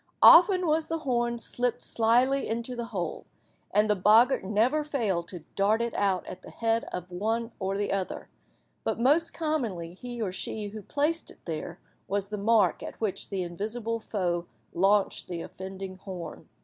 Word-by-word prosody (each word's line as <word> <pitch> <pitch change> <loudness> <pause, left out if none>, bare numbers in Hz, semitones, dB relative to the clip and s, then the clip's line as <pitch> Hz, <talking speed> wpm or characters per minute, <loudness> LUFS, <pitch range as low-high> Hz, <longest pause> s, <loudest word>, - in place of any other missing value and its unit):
Often 365 +1 +8
was 315 0 +2
the 330 - 0
horn 240 -5 0
slipped 245 +1 -1
slyly 245 +4 +2
into 235 +2 -3
the 235 -1 -4
hole, 195 -7 -4 0.4
and 210 +1 +3
the 210 - +3
boggart 220 +7 +5
never 225 +10 +2
failed 215 - -1
to 175 -4 -8
dart 205 +3 +3
it 235 0 -1
out 195 -3 +1
at - - -8
the - - -11
head 230 0 0
of 180 0 -6
one 225 +6 -1
or 195 0 -1
the 205 - -1
other, 195 -1 -3 0.6
but - - -1
most 300 +7 +3
commonly 230 - -2
he 240 +5 -8
or 210 -5 -1
she 205 +2 -3
who 215 +1 -8
placed 300 - -1
it - - -16
there 165 +1 -5 0.3
was 200 0 -1
the 210 - -4
mark 210 -3 +3
at - - -8
which 215 -4 -2
the 195 -2 -2
invisible 220 +6 -3
foe 175 -6 -2 0.3
launched 195 +3 +2
the 170 -2 -4
offending 190 0 -8
horn. 185 -3 -8
215 Hz, 175 wpm, -28 LUFS, 190-240 Hz, 0.6 s, Often